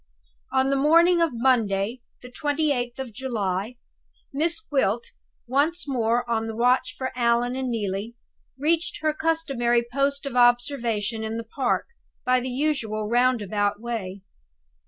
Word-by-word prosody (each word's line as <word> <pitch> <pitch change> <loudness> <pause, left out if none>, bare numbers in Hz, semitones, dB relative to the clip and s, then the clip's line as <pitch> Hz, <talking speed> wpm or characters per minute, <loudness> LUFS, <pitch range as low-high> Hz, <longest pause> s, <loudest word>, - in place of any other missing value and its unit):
On 265 0 +2
the - - +2
morning 335 +4 +5
of 335 - +3
Monday, 230 -2 +1 0.2
the 250 - -10
28th 285 -4 -1
of 265 -4 -6
July, 215 -2 -3 0.6
Miss 325 +6 0
Gwilt 245 - -1 0.3
once 295 +7 +1
more 240 -2 0
on 225 -1 -1
the 225 - -5
watch 245 +3 +2
for 260 -1 -3
Allan 240 0 +1
and 260 -1 -2
Neelie 210 0 -3 0.4
reached 325 +5 0
her 310 -1 +2
customary 275 -8 +1
post 280 +1 0
of 275 -3 -5
observation 240 -3 +2
in 220 +1 -3
the 230 - -4
park, 245 - -1 0.4
by 255 0 +3
the 255 +1 -4
usual 245 -6 -1
roundabout 215 -4 +1
way. 205 -5 -5
245 Hz, 135 wpm, -25 LUFS, 225-275 Hz, 0.6 s, morning